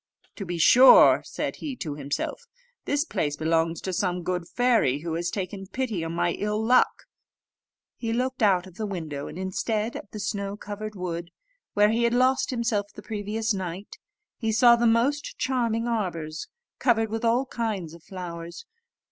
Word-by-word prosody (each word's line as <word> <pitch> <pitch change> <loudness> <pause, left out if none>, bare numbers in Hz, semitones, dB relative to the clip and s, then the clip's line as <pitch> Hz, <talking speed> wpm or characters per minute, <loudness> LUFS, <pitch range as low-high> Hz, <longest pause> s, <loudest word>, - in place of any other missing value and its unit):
"To 195 - -6
be 175 0 -3
sure," 250 +10 +8
said - - -4
he 285 -4 -5
to 155 -11 -5
himself, 145 - -4 0.4
"this 290 +2 +1
place 145 - -2
belongs 165 +1 +1
to 190 - -4
some 180 -1 -1
good 180 -1 -2
fairy, 230 - +2
who 165 0 -4
has 170 +1 -1
taken 195 +1 -5
pity 230 -7 -2
on 165 0 -4
my 175 0 +1
ill 210 +4 -2
luck." 240 +3 +3 0.9
He 230 -2 -3
looked 255 +2 -1
out 190 -4 +3
of 190 0 -14
the 215 -2 -3
window, 155 -7 -5
and - - -8
instead 210 +4 -2
of 200 - -8
the 215 - -8
snow 200 -1 -3
covered 210 +1 -6
wood, 170 -2 -4 0.5
where 210 +1 +5
he 230 +1 +1
had 235 0 +2
lost 260 +2 +3
himself 230 -5 0
the 210 - -12
previous 215 +1 -2
night, 185 +1 -6 0.4
he 225 -2 0
saw 235 +2 +6
the 235 0 +2
most 255 +6 +1
charming 235 -3 0
arbours 170 -9 -3 0.3
covered 225 -3 +2
with 225 +1 -3
all 235 +3 +2
kinds 215 -10 -3
of 170 - -13
flowers. 170 -2 -8
205 Hz, 175 wpm, -26 LUFS, 175-235 Hz, 0.9 s, sure